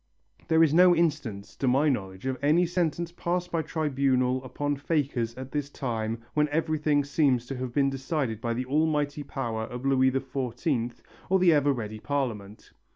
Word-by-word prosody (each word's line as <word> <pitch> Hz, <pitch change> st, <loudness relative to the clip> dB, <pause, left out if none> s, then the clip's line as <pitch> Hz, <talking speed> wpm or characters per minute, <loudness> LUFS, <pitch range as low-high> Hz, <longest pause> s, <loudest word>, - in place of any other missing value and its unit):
There 160 Hz, 0 st, +5 dB
is 155 Hz, -2 st, +3 dB
no 180 Hz, +1 st, +7 dB
instance 140 Hz, -12 st, -1 dB
to 135 Hz, -, -1 dB
my 135 Hz, +5 st, +3 dB
knowledge 95 Hz, -7 st, -2 dB
of 130 Hz, -1 st, -2 dB
any 160 Hz, +5 st, +4 dB
sentence 170 Hz, -1 st, -1 dB
passed 175 Hz, +1 st, -2 dB
by 165 Hz, -, +1 dB
tribunal 135 Hz, -5 st, 0 dB
upon 145 Hz, +2 st, -2 dB
fakers 135 Hz, -6 st, -1 dB
at 130 Hz, 0 st, -8 dB
this 145 Hz, -1 st, -2 dB
time 115 Hz, -4 st, -3 dB
when 150 Hz, 0 st, +2 dB
everything 155 Hz, -1 st, +1 dB
seems 140 Hz, -4 st, +1 dB
to 135 Hz, +1 st, -5 dB
have 130 Hz, -1 st, -4 dB
been 135 Hz, +2 st, +2 dB
decided 135 Hz, -4 st, -2 dB
by 115 Hz, -1 st, -1 dB
the 125 Hz, +2 st, -2 dB
almighty, 150 Hz, +1 st, 0 dB
power 115 Hz, -6 st, -3 dB
of 125 Hz, +2 st, -7 dB
Louis 130 Hz, -1 st, +4 dB
XIV 130 Hz, -1 st, -2 dB, 0.3 s
or 190 Hz, -, +4 dB
the 180 Hz, -3 st, +5 dB
ever 145 Hz, -1 st, +3 dB
ready 110 Hz, -4 st, -4 dB
Parliament. 110 Hz, -7 st, -4 dB
135 Hz, 170 wpm, -27 LUFS, 125-155 Hz, 0.3 s, no